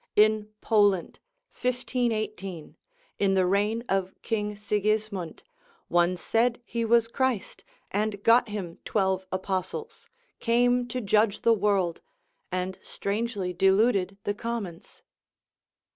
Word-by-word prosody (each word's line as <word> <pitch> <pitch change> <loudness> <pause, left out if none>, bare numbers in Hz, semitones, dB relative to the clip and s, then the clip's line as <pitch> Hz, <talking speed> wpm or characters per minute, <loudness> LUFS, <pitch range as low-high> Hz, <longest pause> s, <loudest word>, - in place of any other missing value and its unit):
In 215 0 +4
Poland, 205 -5 +2 0.3
1518, 215 -8 -2 0.4
in 195 -1 +3
the 185 -1 +3
reign 205 +5 +1
of 190 -1 -1
King 210 -2 -1
Sigismund, 210 -3 -1 0.5
one 175 +1 +3
said 230 +6 +1
he 235 -1 -2
was 230 0 +4
Christ, 255 -3 -2 0.3
and 205 0 -1
got 230 0 +5
him 190 -5 -5
twelve 190 -2 0
apostles, 200 - -4 0.3
came 245 +1 +2
to 250 +1 -3
judge 215 0 +2
the 230 - +5
world, 195 -5 +1 0.5
and 185 +1 -3
strangely 200 -3 -3
deluded 195 +1 +3
the 205 - 0
commons. 205 -6 -6
210 Hz, 110 wpm, -27 LUFS, 190-230 Hz, 0.5 s, got